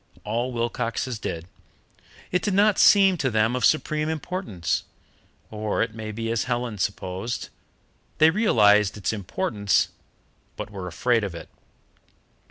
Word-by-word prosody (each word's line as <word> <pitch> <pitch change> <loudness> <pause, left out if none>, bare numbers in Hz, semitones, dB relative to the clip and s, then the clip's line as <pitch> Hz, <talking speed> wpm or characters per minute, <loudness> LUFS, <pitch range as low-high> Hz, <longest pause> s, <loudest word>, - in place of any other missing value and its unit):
All 120 +4 -2
Wilcoxes 115 0 -2
did. 85 -4 -4 0.9
It 180 - +1
did 205 -3 -1
not 205 +1 +4
seem 195 -3 +6
to 135 -4 0
them 110 +1 +1
of 125 - -2
supreme 155 +2 +2
importance. 160 - -2 0.7
Or 105 -1 -1
it 115 -1 -4
may 110 -1 -6
be 115 +1 -3
as 115 - 0
Helen 120 -4 -2
supposed: 95 +3 -3 0.7
they 155 +1 +6
realized 105 - +4
its 105 - -1
importance, 105 - 0 0.7
but - - -6
were 95 -3 -6
afraid 115 +6 +1
of 95 -4 -4
it. - - -9
115 Hz, 135 wpm, -24 LUFS, 105-150 Hz, 0.9 s, seem